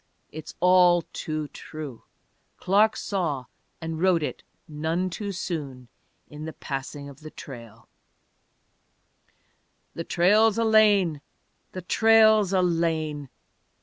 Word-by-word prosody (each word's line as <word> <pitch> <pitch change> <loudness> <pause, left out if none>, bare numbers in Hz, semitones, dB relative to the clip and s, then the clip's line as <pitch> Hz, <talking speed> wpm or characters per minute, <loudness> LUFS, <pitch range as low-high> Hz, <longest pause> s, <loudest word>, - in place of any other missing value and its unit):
It's 155 0 -9
all 180 -1 +5
too 155 -1 -4
true! 150 -6 -9 0.6
Clark 205 +4 +2
saw 160 -10 -2 0.3
and 160 -1 -5
wrote 180 -4 +3
it - - -4 0.3
none 160 +4 -2
too 200 +4 -5
soon 145 -9 -6 0.4
in 150 +1 -9
The 160 - -6
Passing 140 +1 -6
of 140 -2 -12
the 155 - -10
Trail." 120 -7 -12 2.1
The 165 - -5
trail's 205 +6 +3
a 230 - +1
lane, 205 -8 +4 0.5
the 185 - -7
trail's 220 0 +4
a 185 -2 +2
lane. 160 -4 -1
165 Hz, 115 wpm, -25 LUFS, 150-190 Hz, 2.1 s, all